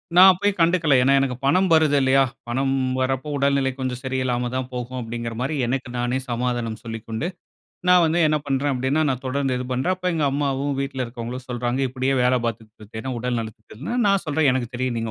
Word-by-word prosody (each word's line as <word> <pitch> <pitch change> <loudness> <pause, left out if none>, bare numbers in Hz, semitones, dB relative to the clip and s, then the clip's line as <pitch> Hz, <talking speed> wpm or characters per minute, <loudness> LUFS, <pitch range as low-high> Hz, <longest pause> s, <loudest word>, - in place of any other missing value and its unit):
நான் 190 +2 +10
அப்பைய 205 +3 +1
கண்டுக்கல. 165 -4 +3
ஏன்னா 135 +1 +4
எனக்கு 135 -2 0
பணம் 185 +6 +3
வருது 155 -2 +4
இல்லையா? 135 +1 +4 0.3
பணம் 135 +2 0 0.2
வரப்போ, 130 +2 -1
உடல்நிலை 140 -1 +2
கொஞ்சம் 125 -1 -3
சரியில்லாம 130 -2 -1
தான் 130 0 -3
போகும் 125 +1 -4
அப்டிங்குற 115 0 -5
மாரி 145 +4 -1
எனக்கு 130 0 -2
நானே 125 +2 0
சமாதானம் 120 -2 -2
சொல்லிக்கொண்டு, 115 +5 -4 0.6
நான் 180 -1 +7
வந்து 165 +2 +1
என்ன 155 0 +2
பண்ணுறேன் 140 +1 0
அப்படின்னா, 130 +5 +1
நான் 130 0 -2
தொடர்ந்து 135 -1 0
இது 125 - -4
பண்ணுறேன். 155 +9 0
அப்போ 180 0 -2
எங்க 155 -2 0
அம்மாவும், 140 0 -1
வீட்ல 135 -1 -3
இருக்கிவங்களும் 120 +2 -7
சொல்றாங்க, 125 +1 -2
இப்படியே 130 +1 -1
வேலை 125 0 +3
பாத்துக்ட் 110 -1 -6
திரிஞ்சேன்னா 110 +4 -6
உடல் 125 -1 -1
நலத்துக்கு, 110 -1 -9
கேடுன்னா, 155 - -4
நான் 195 -2 +2
சொல்றேன் 150 -2 +2
"எனக்கு 125 -2 -2
தெரியும். 125 -1 -2
நீங்க 115 0 -3
130 Hz, 190 wpm, -23 LUFS, 120-140 Hz, 0.6 s, நான்